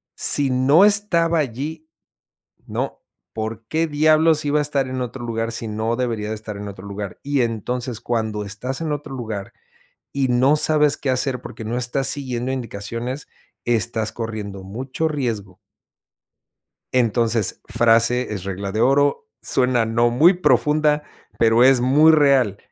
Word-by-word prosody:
Si 140 Hz, -2 st, +3 dB
no 130 Hz, +7 st, +4 dB
estaba 190 Hz, -5 st, +3 dB
allí, 150 Hz, +4 st, -4 dB, 0.8 s
¿no? -, -, -4 dB, 0.3 s
¿Por 110 Hz, +1 st, -5 dB
qué, 160 Hz, +1 st, 0 dB
diablos 155 Hz, +1 st, +3 dB
iba 145 Hz, +1 st, +2 dB
a -, -, +1 dB
estar 140 Hz, -2 st, -1 dB
en 130 Hz, 0 st, -3 dB
otro 125 Hz, +1 st, -6 dB
lugar 115 Hz, 0 st, -3 dB
si 115 Hz, 0 st, -4 dB
no 110 Hz, +2 st, -2 dB
debería 115 Hz, -4 st, -2 dB
de -, -, -2 dB
estar 105 Hz, -1 st, -8 dB
en 100 Hz, 0 st, -7 dB
otro 100 Hz, 0 st, -10 dB
lugar? 100 Hz, -1 st, -7 dB
Y 140 Hz, -2 st, 0 dB
entonces 120 Hz, +1 st, -3 dB
cuando 110 Hz, -3 st, -2 dB
estás 125 Hz, +8 st, -5 dB
en 160 Hz, -2 st, -3 dB
otro 145 Hz, -2 st, -5 dB
lugar 110 Hz, -6 st, -6 dB, 0.6 s
y 135 Hz, -2 st, 0 dB
no 130 Hz, +4 st, +3 dB
sabes 150 Hz, -1 st, +2 dB
qué 135 Hz, -, -2 dB
hacer, 130 Hz, 0 st, 0 dB
porque, 110 Hz, -, -9 dB
no 115 Hz, +3 st, -3 dB
estás 125 Hz, +2 st, 0 dB
siguiendo 130 Hz, -3 st, -2 dB
indicaciones, 120 Hz, +2 st, -5 dB, 0.4 s
estás 115 Hz, -2 st, 0 dB
corriendo 105 Hz, -4 st, -6 dB
mucho 130 Hz, +10 st, -4 dB
riesgo. 110 Hz, -, -4 dB, 1.4 s
Entonces, 115 Hz, -3 st, +1 dB
frase 115 Hz, +1 st, +2 dB
es 95 Hz, -4 st, -5 dB
regla 100 Hz, 0 st, -4 dB
de 110 Hz, +3 st, -1 dB
oro, 140 Hz, -, +2 dB
suena 125 Hz, -2 st, +1 dB
no 115 Hz, +2 st, +2 dB
muy 155 Hz, +10 st, +5 dB
profunda, 150 Hz, -1 st, +2 dB, 0.4 s
pero, 115 Hz, +1 st, +4 dB
es 130 Hz, 0 st, +5 dB
muy 145 Hz, +6 st, +5 dB
real, 135 Hz, -9 st, +3 dB
125 Hz, 150 wpm, -21 LUFS, 110-145 Hz, 1.4 s, muy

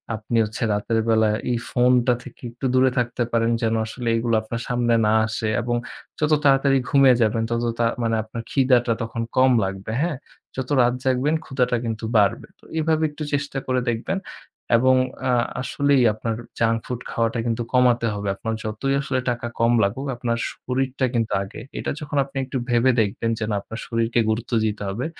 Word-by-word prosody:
আপনি 110 Hz, +2 st, -2 dB
হচ্ছে 105 Hz, +2 st, -5 dB
রাতের 110 Hz, +2 st, 0 dB
বেলা 110 Hz, -1 st, +4 dB, 0.2 s
এই 120 Hz, -, +1 dB
phone 125 Hz, 0 st, +3 dB
টা 125 Hz, -, +5 dB
থেকে 125 Hz, -, -13 dB
একটু 125 Hz, +3 st, -7 dB
দূরে 130 Hz, 0 st, +4 dB
থাকতে 120 Hz, 0 st, 0 dB
পারেন 115 Hz, 0 st, +2 dB
যেন 115 Hz, 0 st, +1 dB
আসলে 120 Hz, +2 st, -6 dB
এইগুলো 115 Hz, 0 st, +1 dB
আপনার 115 Hz, +1 st, -5 dB
সামনে 120 Hz, -2 st, +1 dB
না 105 Hz, -, +3 dB
আসে 110 Hz, 0 st, -2 dB
এবং 120 Hz, +1 st, -1 dB, 0.4 s
যত 155 Hz, 0 st, +1 dB
তাড়াতাড়ি 135 Hz, 0 st, +4 dB
ঘুমিয়ে 135 Hz, -3 st, +6 dB
যাবেন 115 Hz, 0 st, +2 dB
তত 115 Hz, 0 st, -1 dB, 0.2 s
তা 120 Hz, -, +3 dB, 0.2 s
মানে 115 Hz, 0 st, +1 dB
আপনার 115 Hz, +1 st, -7 dB
খিদাটা 125 Hz, -3 st, +3 dB
তখন 115 Hz, +1 st, -4 dB, 0.2 s
কম 130 Hz, 0 st, +6 dB
লাগবে, 95 Hz, +2 st, -5 dB
হ্যাঁ? 160 Hz, -4 st, -1 dB, 0.4 s
যত 130 Hz, -1 st, -4 dB
রাত 120 Hz, 0 st, +3 dB
জাগবেন 130 Hz, +4 st, +1 dB
ক্ষুধাটা 125 Hz, -2 st, 0 dB
কিন্তু 110 Hz, -1 st, -3 dB
বাড়বে। 100 Hz, -1 st, +2 dB
তো -, -, -34 dB, 0.2 s
এভাবে 160 Hz, 0 st, +1 dB
একটু 150 Hz, +1 st, -7 dB
চেষ্টা 140 Hz, -1 st, -2 dB
করে 130 Hz, 0 st, +1 dB
দেখবেন 120 Hz, +12 st, -2 dB, 0.6 s
এবং 130 Hz, +2 st, +4 dB, 0.4 s
আ -, -, +2 dB, 0.3 s
আসলেই 140 Hz, 0 st, +2 dB
আপনার 110 Hz, +1 st, -3 dB, 0.2 s
junk 115 Hz, 0 st, +2 dB
food 125 Hz, -1 st, -4 dB
খাওয়াটা 115 Hz, 0 st, 0 dB
কিন্তু 120 Hz, 0 st, -1 dB
কমাতে 120 Hz, -2 st, +3 dB
হবে। 100 Hz, 0 st, -4 dB
আপনার 115 Hz, +2 st, -4 dB
যতই 110 Hz, +6 st, -2 dB
আসলে 135 Hz, -1 st, -1 dB
টাকা 120 Hz, 0 st, -2 dB
কম 115 Hz, +1 st, +4 dB
লাগুক 120 Hz, +8 st, -1 dB
আপনার 120 Hz, -1 st, -1 dB
শরীরটা 130 Hz, +1 st, -2 dB
কিন্তু 115 Hz, -2 st, 0 dB
আগে। 95 Hz, -, -9 dB, 0.2 s
এটা -, -, -2 dB
যখন 145 Hz, -1 st, -4 dB
আপনি 135 Hz, 0 st, -10 dB
একটু 130 Hz, -, -4 dB
ভেবে 120 Hz, +2 st, +4 dB
দেখবেন 110 Hz, +2 st, -1 dB
যে 115 Hz, -, -2 dB
না 105 Hz, -, 0 dB
আপনার 110 Hz, +3 st, -8 dB
শরীরকে 115 Hz, 0 st, 0 dB
গুরুত্ব 115 Hz, +3 st, -2 dB
দিতে 105 Hz, -1 st, -2 dB
হবে, 115 Hz, +8 st, -3 dB
120 Hz, 185 wpm, -23 LUFS, 115-130 Hz, 0.6 s, ঘুমিয়ে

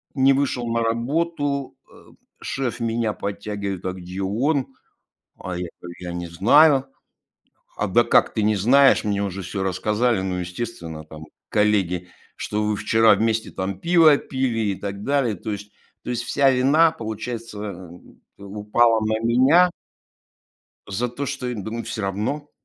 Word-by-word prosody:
не 135 Hz, 0 st, +5 dB
вышел 130 Hz, -3 st, -1 dB
на 115 Hz, 0 st, 0 dB
работу. 140 Hz, +4 st, -1 dB
Э, -, -, -18 dB, 0.3 s
шеф 125 Hz, -3 st, -3 dB
меня 115 Hz, -2 st, 0 dB
подтягивает: 100 Hz, -2 st, -5 dB
"А 95 Hz, -, -2 dB
где 90 Hz, +1 st, -7 dB
он?" 130 Hz, +7 st, -1 dB, 0.6 s
А 90 Hz, -1 st, -5 dB
я 90 Hz, -1 st, -4 dB
говорю: 85 Hz, 0 st, -10 dB
"Я 90 Hz, -1 st, -6 dB
не 85 Hz, 0 st, -5 dB
знаю"- 135 Hz, -, +5 dB, 0.9 s
"А -, -, 0 dB
да -, -, +4 dB
как -, -, +3 dB
ты 110 Hz, -, -1 dB
не 105 Hz, 0 st, +2 dB
знаешь? 135 Hz, +8 st, +5 dB
Мне 100 Hz, -1 st, -1 dB
уже 95 Hz, -1 st, -4 dB
всё 95 Hz, +2 st, -4 dB
рассказали. 105 Hz, +4 st, 0 dB
Ну, 95 Hz, -1 st, -2 dB
естественно, 90 Hz, -4 st, -6 dB
там, 80 Hz, 0 st, -11 dB, 0.2 s
коллеги, 95 Hz, -4 st, +1 dB, 0.3 s
что 105 Hz, +1 st, -2 dB
вы 105 Hz, 0 st, 0 dB
вчера 110 Hz, +1 st, +4 dB
вместе 110 Hz, +2 st, 0 dB
там 95 Hz, 0 st, -4 dB
пиво 165 Hz, -, +5 dB
пили 115 Hz, -6 st, -1 dB
и -, -, -3 dB
так 100 Hz, +1 st, -6 dB
далее". 135 Hz, -6 st, +1 dB
То 105 Hz, -, -6 dB
есть 105 Hz, 0 st, -7 dB, 0.3 s
то -, -, -7 dB
есть 120 Hz, -1 st, -2 dB
вся 140 Hz, +2 st, +3 dB
вина, 140 Hz, +6 st, +4 dB
получается, 110 Hz, -, -6 dB, 0.5 s
упала 105 Hz, +3 st, +1 dB
на 110 Hz, 0 st, 0 dB
меня. 130 Hz, +10 st, +4 dB, 1.2 s
за 115 Hz, +5 st, -2 dB
то, 135 Hz, +4 st, -5 dB
что 130 Hz, -2 st, -4 dB
я 125 Hz, -, -3 dB
думаю, 110 Hz, +2 st, -5 dB
всё 110 Hz, -, -5 dB
равно. 110 Hz, +10 st, -3 dB
110 Hz, 155 wpm, -22 LUFS, 100-130 Hz, 1.2 s, не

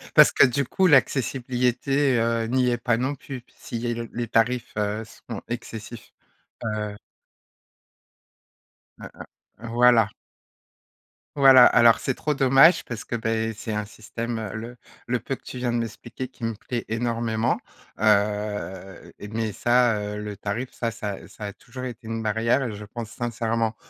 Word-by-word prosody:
parce -, -, +8 dB
que, -, -, +6 dB
du 130 Hz, +2 st, 0 dB
coup, 190 Hz, +8 st, +1 dB
l'accessibilité, 130 Hz, -1 st, +2 dB
heu, 115 Hz, 0 st, +1 dB
n'y 125 Hz, +1 st, +2 dB
est 120 Hz, -, +1 dB
pas 120 Hz, 0 st, +1 dB
non 130 Hz, +4 st, -1 dB
plus 130 Hz, -2 st, -8 dB
s'il 115 Hz, -, -6 dB
y 120 Hz, -, -2 dB
a -, -, 0 dB
le 115 Hz, -1 st, -5 dB
les 120 Hz, -1 st, -3 dB
tarifs, 120 Hz, +2 st, +1 dB
heu, 105 Hz, +1 st, -1 dB
sont 115 Hz, 0 st, -9 dB
excessifs, 115 Hz, -1 st, -7 dB, 0.5 s
heu 105 Hz, -1 st, -3 dB, 2.0 s
Hein -, -, -8 dB, 0.5 s
hein. 115 Hz, 0 st, -8 dB
Voilà 120 Hz, -3 st, +5 dB, 1.3 s
voilà, 135 Hz, -2 st, +9 dB
alors 115 Hz, -1 st, +6 dB
c'est 130 Hz, -, -1 dB
trop 150 Hz, -, -1 dB
dommage 135 Hz, +5 st, +5 dB
parce 120 Hz, -2 st, -6 dB
que, 120 Hz, -, -3 dB
beh, 115 Hz, 0 st, -1 dB
c'est 110 Hz, 0 st, -5 dB
un 105 Hz, 0 st, -1 dB
système, 115 Hz, +2 st, -5 dB
heu, 110 Hz, -3 st, -5 dB
le 120 Hz, +3 st, -7 dB, 0.3 s
le 125 Hz, 0 st, 0 dB
peu 135 Hz, -, -4 dB
que -, -, -21 dB
tu 125 Hz, -, -8 dB
viens 125 Hz, -1 st, -1 dB
de -, -, +1 dB
m'expliquer, 120 Hz, +3 st, -5 dB
qui 120 Hz, -3 st, -7 dB
me 115 Hz, -, -1 dB
plaît 120 Hz, +2 st, -5 dB
énormément, 115 Hz, 0 st, 0 dB, 0.4 s
heu, 105 Hz, -2 st, 0 dB
et 105 Hz, -, -7 dB
mais 110 Hz, 0 st, -2 dB
ça, 120 Hz, -1 st, +3 dB
heu, 105 Hz, 0 st, -4 dB
le 105 Hz, -1 st, -6 dB
tarif, 115 Hz, +5 st, -4 dB
ça 115 Hz, -1 st, -3 dB
ça, 105 Hz, -3 st, -5 dB
heu, -, -, -13 dB
ça 105 Hz, -, -12 dB
a 100 Hz, -, -5 dB
toujours 130 Hz, +1 st, -10 dB
été 120 Hz, -2 st, -7 dB
une 115 Hz, 0 st, -3 dB
barrière 115 Hz, +5 st, +1 dB
et 115 Hz, -4 st, -3 dB
je 105 Hz, 0 st, -8 dB
pense 115 Hz, +1 st, -7 dB
sincèrement 115 Hz, -1 st, -1 dB
115 Hz, 170 wpm, -24 LUFS, 110-125 Hz, 2.0 s, voilà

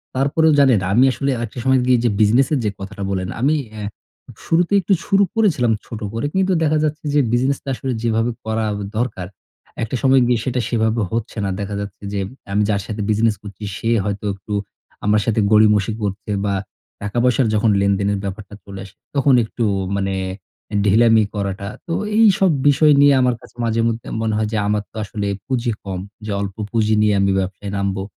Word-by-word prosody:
তারপরেও 150 Hz, +4 st, +3 dB
জানেন, 130 Hz, -6 st, +5 dB
আমি 120 Hz, +5 st, +5 dB
আসলে 135 Hz, +2 st, -1 dB
আরকটা 120 Hz, +1 st, -5 dB
সময় 130 Hz, 0 st, +4 dB
গিয়ে 125 Hz, 0 st, +4 dB
যে 120 Hz, -, +3 dB
বিজনেসের 130 Hz, +7 st, +3 dB
যে -, -, +2 dB
কথাটা 100 Hz, +1 st, -7 dB
বলেন, 95 Hz, -1 st, -2 dB
আমি 145 Hz, +4 st, +3 dB, 0.2 s
অ্যা 110 Hz, -1 st, -7 dB, 0.6 s
শুরুতেই 175 Hz, +4 st, +2 dB
একটু 190 Hz, +3 st, +2 dB
শুরু 200 Hz, 0 st, +3 dB
করেছিলাম 160 Hz, -, +2 dB
ছোট 115 Hz, -, -7 dB
করে। 115 Hz, +4 st, -2 dB
কিন্তু 190 Hz, 0 st, +2 dB
দেখা 155 Hz, 0 st, +2 dB
যাচ্ছে, 155 Hz, 0 st, -2 dB
যে 145 Hz, -, +4 dB
বিজনেসটা 135 Hz, +3 st, 0 dB
আসলে 130 Hz, 0 st, -3 dB
যেভাবে 115 Hz, +1 st, +1 dB
করা 110 Hz, 0 st, -1 dB, 0.3 s
দরকার, 110 Hz, -6 st, -2 dB, 0.6 s
একটা 115 Hz, +3 st, -3 dB
সময় 135 Hz, -1 st, +5 dB
গিয়ে 120 Hz, -2 st, +2 dB
সেটা 130 Hz, -1 st, -1 dB
সেভাবে 110 Hz, 0 st, +1 dB
হচ্ছে 115 Hz, 0 st, -3 dB
না। -, -, -1 dB
দেখা 100 Hz, 0 st, -4 dB
যাচ্ছে, 100 Hz, 0 st, -8 dB
যে 100 Hz, -, -1 dB, 0.3 s
আমি 105 Hz, +1 st, +2 dB
যার 100 Hz, -1 st, +1 dB
সাথে 110 Hz, -1 st, -4 dB
বিজনেস 110 Hz, +1 st, +2 dB
করছি, 100 Hz, 0 st, -10 dB
সে 115 Hz, -, -2 dB, 0.2 s
হয়তো 105 Hz, 0 st, -3 dB
একটু 100 Hz, +2 st, -8 dB, 0.5 s
আমার 105 Hz, 0 st, +3 dB
সাথে 115 Hz, -1 st, +1 dB
গড়িমসি 105 Hz, -1 st, +4 dB
করছে 100 Hz, +1 st, -3 dB
বা 100 Hz, -, 0 dB, 0.5 s
টাকা-পয়সার 120 Hz, +4 st, +1 dB
যখন 105 Hz, +2 st, +2 dB
লেনদেনের 100 Hz, 0 st, +1 dB
ব্যাপারটা 100 Hz, +1 st, -6 dB
চলে 100 Hz, -1 st, -9 dB
আসে, 100 Hz, -, -16 dB, 0.2 s
তখন 140 Hz, -1 st, +4 dB
একটু 115 Hz, +2 st, -4 dB, 0.3 s
মানে 95 Hz, -1 st, -1 dB, 0.5 s
অ্যা 105 Hz, -, -5 dB
ঢিলামি 110 Hz, +2 st, +5 dB
করাটা। 100 Hz, -1 st, -3 dB, 0.2 s
তো, 165 Hz, -, -2 dB, 0.2 s
এইসব 195 Hz, -4 st, +5 dB, 0.2 s
বিষয় 150 Hz, +1 st, +5 dB
নিয়ে 145 Hz, 0 st, +6 dB
আমার 125 Hz, -1 st, +2 dB
কাছে -, -, -17 dB
মাঝেমধ্যে 115 Hz, 0 st, 0 dB
মনে 110 Hz, -1 st, 0 dB
হয়, 110 Hz, 0 st, 0 dB
যে -, -, +1 dB
আমার 105 Hz, 0 st, 0 dB
তো -, -, -27 dB
আসলে 100 Hz, 0 st, -4 dB, 0.2 s
পুঁজি 125 Hz, -2 st, 0 dB
কম। 95 Hz, -2 st, -4 dB, 0.3 s
যে 105 Hz, -, -4 dB
অল্প 100 Hz, -1 st, -4 dB, 0.2 s
পুঁজি 110 Hz, -2 st, +2 dB
নিয়ে 105 Hz, -1 st, +3 dB
আমি 100 Hz, 0 st, +2 dB
ব্যবসায় 95 Hz, +1 st, -4 dB
নামবো। 100 Hz, -1 st, -1 dB
110 Hz, 185 wpm, -20 LUFS, 100-130 Hz, 0.6 s, নিয়ে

